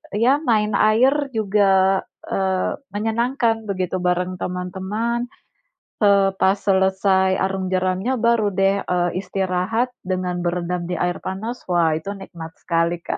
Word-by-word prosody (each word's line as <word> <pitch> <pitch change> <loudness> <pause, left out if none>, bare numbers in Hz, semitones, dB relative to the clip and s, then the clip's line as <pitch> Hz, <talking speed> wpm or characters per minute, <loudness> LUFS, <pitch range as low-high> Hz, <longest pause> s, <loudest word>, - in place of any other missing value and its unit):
ya 235 +6 +4
main 215 -4 +1
air 260 +7 +3
juga, 195 -2 +3 0.3
eee, 190 -1 0 0.2
menyenangkan 225 +1 0
begitu 185 -1 -1
bareng 180 +1 0
teman-teman, 195 +7 -3 0.7
eee, 200 -2 +5
pas 190 +2 +3
selesai 190 -1 +2
arung 190 0 -1
jeramnya, 185 +6 0
baru 230 -3 +3
deh, 195 +1 +1
eee, 175 -1 +1
istirahat 190 +5 -1 0.2
dengan 180 -1 -2
berendam 175 0 -2
di 180 - -4
air 175 +1 -1
panas. 220 +6 -5
Wah 170 -3 +3
itu 195 +5 -5
nikmat 165 -4 -9
sekali, 170 0 0
Kak. - - -4
190 Hz, 130 wpm, -21 LUFS, 180-215 Hz, 0.7 s, eee